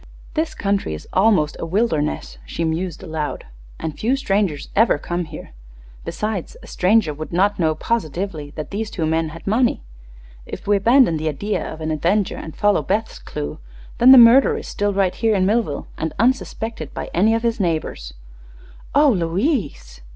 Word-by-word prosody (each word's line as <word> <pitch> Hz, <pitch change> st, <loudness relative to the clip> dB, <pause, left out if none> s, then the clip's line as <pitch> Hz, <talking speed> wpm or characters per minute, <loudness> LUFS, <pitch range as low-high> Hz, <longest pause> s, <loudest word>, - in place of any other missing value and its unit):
"This 320 Hz, 0 st, -1 dB
country 200 Hz, -, -1 dB
is 75 Hz, -, -11 dB
almost 190 Hz, -7 st, +3 dB
a -, -, -3 dB
wilderness," 165 Hz, -5 st, -1 dB
she 165 Hz, -, -4 dB
mused, 165 Hz, +2 st, -3 dB
aloud, 160 Hz, -4 st, -4 dB, 0.3 s
"and 155 Hz, -2 st, -5 dB
few 245 Hz, +5 st, +1 dB
strangers 195 Hz, -, -1 dB
ever 220 Hz, -6 st, +4 dB
come 175 Hz, +4 st, -3 dB
here. 155 Hz, 0 st, -10 dB, 0.5 s
Besides, 210 Hz, -4 st, -4 dB
a -, -, -11 dB
stranger 185 Hz, -4 st, +2 dB
would 155 Hz, +2 st, -7 dB
not 195 Hz, +4 st, +1 dB
know 160 Hz, -2 st, +2 dB
positively 165 Hz, -5 st, -3 dB
that 155 Hz, -, -6 dB
these 210 Hz, +2 st, -3 dB
two 165 Hz, -, -3 dB
men 160 Hz, 0 st, 0 dB
had 160 Hz, 0 st, -11 dB
money. 230 Hz, -, +1 dB, 0.6 s
If -, -, -9 dB
we 205 Hz, 0 st, +3 dB
abandon 235 Hz, -, +4 dB
the 155 Hz, +1 st, -1 dB
idea 200 Hz, +9 st, -2 dB
of 160 Hz, -, -9 dB
an 155 Hz, 0 st, -2 dB
avenger, 180 Hz, +6 st, 0 dB
and 160 Hz, -, -8 dB
follow 205 Hz, -1 st, +3 dB
Beth's 215 Hz, +4 st, -2 dB
clue, 75 Hz, 0 st, -6 dB, 0.4 s
then 250 Hz, +2 st, +8 dB
the 265 Hz, -, +10 dB
murderer 240 Hz, +3 st, +7 dB
is -, -, -7 dB
still 205 Hz, 0 st, -1 dB
right 195 Hz, -2 st, +1 dB
here 225 Hz, -2 st, +1 dB
in 185 Hz, -1 st, +2 dB
Millville, 205 Hz, -8 st, 0 dB
and 160 Hz, 0 st, -2 dB
unsuspected 225 Hz, -, -1 dB
by -, -, -5 dB
any 215 Hz, +6 st, +3 dB
of 225 Hz, -, -2 dB
his 230 Hz, -1 st, 0 dB
neighbors." 155 Hz, -, -2 dB, 0.8 s
"Oh, 295 Hz, 0 st, +6 dB
Louise!" 170 Hz, -, -2 dB
190 Hz, 175 wpm, -21 LUFS, 155-220 Hz, 0.8 s, the